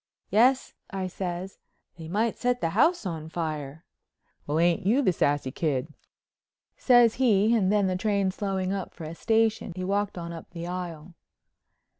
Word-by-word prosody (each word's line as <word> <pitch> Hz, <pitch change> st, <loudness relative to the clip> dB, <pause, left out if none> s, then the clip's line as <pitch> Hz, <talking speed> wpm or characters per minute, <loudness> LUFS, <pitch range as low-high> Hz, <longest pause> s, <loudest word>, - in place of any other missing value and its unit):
"Yes," 255 Hz, +5 st, +3 dB, 0.2 s
I 190 Hz, -1 st, -3 dB
says, 185 Hz, 0 st, -5 dB, 0.4 s
"they 165 Hz, -2 st, -9 dB
might 215 Hz, +6 st, 0 dB
set 245 Hz, 0 st, 0 dB
the 165 Hz, -, -1 dB
house 295 Hz, -, +3 dB
on 160 Hz, -3 st, -4 dB
fire." 155 Hz, -2 st, -4 dB, 0.6 s
"Well, 150 Hz, +2 st, 0 dB
ain't 175 Hz, +4 st, +2 dB
you 235 Hz, +9 st, +3 dB
the 185 Hz, -, +3 dB
sassy 145 Hz, -4 st, 0 dB
kid," 150 Hz, 0 st, -2 dB, 0.8 s
says 240 Hz, -3 st, +5 dB
he 220 Hz, -2 st, +4 dB
and 195 Hz, -4 st, +2 dB
then 205 Hz, -1 st, +3 dB
the 185 Hz, -1 st, 0 dB
train 200 Hz, 0 st, +1 dB
slowing 190 Hz, -1 st, -2 dB
up 195 Hz, -2 st, -5 dB
for -, -, -9 dB
a 155 Hz, +1 st, -6 dB
station 220 Hz, 0 st, +1 dB
he 185 Hz, -, -4 dB
walked 200 Hz, +1 st, -1 dB
on 170 Hz, -1 st, -5 dB
up 165 Hz, -, -10 dB
the 170 Hz, -1 st, -6 dB
aisle. 175 Hz, -2 st, -6 dB
185 Hz, 165 wpm, -27 LUFS, 165-210 Hz, 0.8 s, says